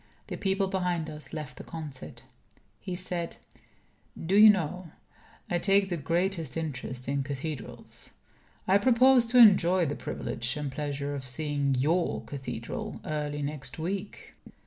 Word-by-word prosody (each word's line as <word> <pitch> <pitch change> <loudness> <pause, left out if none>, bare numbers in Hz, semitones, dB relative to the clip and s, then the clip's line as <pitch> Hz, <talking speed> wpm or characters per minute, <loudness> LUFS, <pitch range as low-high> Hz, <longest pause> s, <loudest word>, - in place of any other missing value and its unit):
The - - -3
people 195 0 0
behind 180 -4 -1
us 150 0 -8
left 150 -4 -6
the - - -8
concert. 140 -6 -8 0.6
He 185 -2 -5
said: 175 -2 -3 0.8
"Do 175 +4 0
you 215 +1 +10
know, 180 -2 0 0.6
I 175 - 0
take 195 +1 +3
the 175 - -1
greatest 165 -1 -1
interest 130 -5 -5
in 140 +1 0
cathedrals. 140 0 -6 0.6
I 195 +2 +5
propose 250 +2 +5
to 250 +2 +2
enjoy 185 -6 +7
the 145 - -1
privilege 120 +4 -3
and 145 -2 -3
pleasure 145 0 -3
of 135 -2 -6
seeing 140 0 0
your 160 +7 +1
cathedral 125 -5 -6
early 150 -1 -2
next 140 -2 -4
week." 190 +5 -5
160 Hz, 140 wpm, -28 LUFS, 140-190 Hz, 0.8 s, you